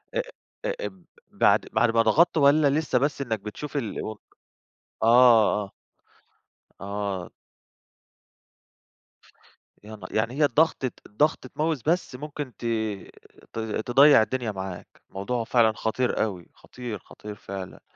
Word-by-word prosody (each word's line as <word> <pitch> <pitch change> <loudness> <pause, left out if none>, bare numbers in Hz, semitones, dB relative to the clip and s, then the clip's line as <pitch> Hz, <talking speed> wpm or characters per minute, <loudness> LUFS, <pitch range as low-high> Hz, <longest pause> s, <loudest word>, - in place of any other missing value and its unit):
أ - - +1 0.5
أ - - -3
أب - - -9 0.3
بعد - - +3
بعد 120 -1 +3
ما 115 - +4
ضغطت 170 +7 +3
والّا 145 0 +5
لسّه 155 - 0
بس 140 0 -1
إنّك 110 -5 -2
بتشوف 135 +8 -6
ال 110 -3 -4 0.9
آه، 115 -3 +6
آه. 100 - -11 1.1
آه. 100 -2 -4 2.5
يا 110 +1 -9
ن - - -15
يعني 115 +3 0
هي 145 +1 +3
الضغطة 140 -2 +1
الضغطة 130 +3 0
mouse 155 -4 0
بس 170 -6 0
ممكن 145 -1 -6
ت 120 - -8 0.9
ت - - -4
تضيّع 120 +5 +5
الدنيا 120 -1 -2
معاك. 95 -2 -8
الموضوع 115 +5 -3
فعلًا 115 -1 +3
خطير 110 +2 -1
أوي، 95 -6 -5
خطير، 120 -5 -8
خطير 105 -1 -10
فعلًا. 95 -2 -8
120 Hz, 125 wpm, -25 LUFS, 105-140 Hz, 2.5 s, آه